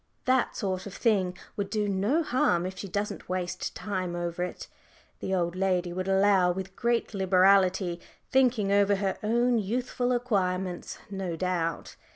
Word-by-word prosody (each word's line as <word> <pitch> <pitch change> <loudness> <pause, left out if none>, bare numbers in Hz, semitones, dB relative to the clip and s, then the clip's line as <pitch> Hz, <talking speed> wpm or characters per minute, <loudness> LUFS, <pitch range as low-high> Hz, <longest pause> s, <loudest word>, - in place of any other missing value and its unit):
That 255 -1 +2
sort 190 -1 -2
of 195 - -9
thing 190 -6 +1 0.2
would 200 -1 -3
do 210 -2 0
no 205 - +1
harm 180 - +1
if 190 +1 -4
she 200 - -6
doesn't 205 +1 -4
waste 180 -1 -3
time 185 -4 -3
over 175 0 -2
it," 180 - -6 0.5
the 190 - -1
old 175 -1 0
lady 185 -2 0
would 185 +1 -3
allow, 195 -2 +4
with 190 +1 -5
great 235 -1 0
liberality, 190 -2 +3 0.3
thinking 245 -6 +3
over 200 0 +4
her 195 -1 -2
own 235 +2 +2
youthful 245 +4 -1
acquirements 190 -7 -1
no 190 -4 -3
doubt. 170 -2 -2
190 Hz, 155 wpm, -28 LUFS, 180-210 Hz, 0.5 s, allow